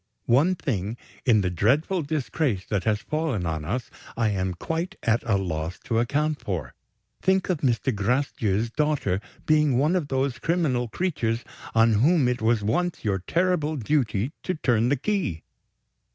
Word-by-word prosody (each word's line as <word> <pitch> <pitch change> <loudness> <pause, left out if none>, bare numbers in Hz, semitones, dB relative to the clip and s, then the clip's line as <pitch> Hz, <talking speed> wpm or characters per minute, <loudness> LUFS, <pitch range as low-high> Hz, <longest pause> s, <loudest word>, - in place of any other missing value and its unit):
One 145 +10 +4
thing, 110 - -2 0.3
in 110 -4 +5
the 90 -2 0
dreadful 140 - +2
disgrace 145 - -1
that 100 -3 0
has 105 -2 +1
fallen 150 - -1
on 80 -2 -2
us, 120 +11 -3 0.3
I 115 -2 +2
am 95 -3 -1
quite 165 - -3
at 115 +1 +2
a 100 - +4
loss 85 -3 -3
to 115 -1 0
account 150 +5 0
for. 80 -10 -3 0.5
Think 190 0 +2
of 170 - -1
Mr. 130 -1 +1
Gracedieu's 110 -1 0
daughter 145 -10 0 0.2
being 150 -4 +3
one 150 +7 +2
of 170 -6 0
those 135 -2 -1
criminal 145 -7 +1
creatures 120 -6 -1 0.3
on 115 0 +5
whom 155 -1 +4
it 125 -1 -1
was 110 -1 +2
once 175 +9 -1
your 100 -2 +1
terrible 165 - 0
duty 125 -3 0
to 185 - -2
turn 120 -6 +2
the 140 - +2
key! 150 - -1
125 Hz, 160 wpm, -25 LUFS, 105-155 Hz, 0.5 s, in